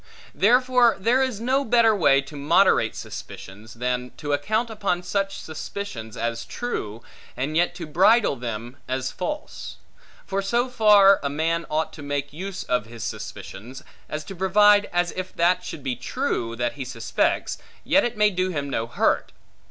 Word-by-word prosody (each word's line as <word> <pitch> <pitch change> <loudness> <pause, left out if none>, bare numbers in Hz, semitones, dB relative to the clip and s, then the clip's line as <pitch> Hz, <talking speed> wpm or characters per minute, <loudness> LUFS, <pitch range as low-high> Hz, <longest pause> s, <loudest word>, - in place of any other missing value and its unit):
Therefore 250 +2 +4
there 235 +7 +3
is 260 -6 -1
no 260 +4 +1
better 230 -2 +4
way, 140 -7 +4
to 140 +2 -12
moderate 160 +7 +3
suspicions, 105 +4 -9
than 125 +1 -2
to 145 -1 -3
account 220 +11 0
upon 200 -5 -1
such 195 +1 -2
suspicions 155 - -7
as 115 0 -2
true, 115 - -5 0.3
and 140 +4 -2
yet 175 +1 +2
to 175 -2 -6
bridle 190 +5 +4
them 120 +1 -6
as 130 0 -2
false. 300 +11 -5 0.5
For 195 0 -1
so 240 +6 0
far 210 -5 +6
a 140 - -1
man 165 +3 -1
ought 155 +1 -1
to 155 - -10
make 145 0 -3
use 190 +4 -5
of 125 -3 -1
suspicions, 110 +3 -7 0.3
as 150 0 -4
to 195 - -9
provide, 205 +3 +4
as 175 0 +1
if 185 0 -6
that 175 +2 +2
should 145 - -7
be 130 -2 -2
true, 120 - -2
that 120 0 -1
he 140 - -6
suspects, 125 - -1 0.2
yet 290 - +3
it 240 -2 -2
may 210 0 +4
do 185 0 0
him 145 -5 -3
no 115 -2 -1
hurt. - - 0
170 Hz, 165 wpm, -24 LUFS, 130-210 Hz, 0.5 s, far